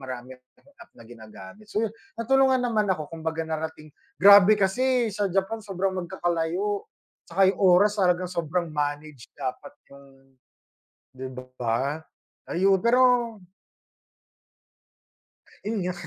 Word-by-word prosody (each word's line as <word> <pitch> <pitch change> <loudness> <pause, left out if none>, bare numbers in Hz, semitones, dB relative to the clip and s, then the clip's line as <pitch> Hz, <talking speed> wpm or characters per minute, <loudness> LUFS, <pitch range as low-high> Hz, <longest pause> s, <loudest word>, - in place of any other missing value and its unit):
marami 130 -1 -8 0.5
app - - -15
na 115 - -15
ginagamit 110 - -13
so 215 +2 -1
yun 220 - -4 0.2
natulungan 260 +2 +2
naman 215 -4 0
ako 155 -4 -2
kumbaga 160 0 -4
narating 160 -1 -6 0.2
grabe 200 +2 +7
kasi 235 +3 +1
sa 205 -1 -1
Japan 195 +4 -1
sobrang 195 -2 -2
magkakalayo 175 +2 -2 0.5
saka 190 +2 +3
yung - - -12
oras 200 +3 +4
talagang 180 -1 +2
sobrang 170 -1 -3
manage 145 -3 -4
dapat 130 -3 -5 0.2
yung 140 0 -15 1.1
di 130 0 -8 0.3
ba? 125 +6 -1 0.5
Ayun 195 +2 +2
pero 240 +1 +3 2.3
Yun 215 -1 -2
nga. 180 0 -2
180 Hz, 115 wpm, -25 LUFS, 155-210 Hz, 2.3 s, grabe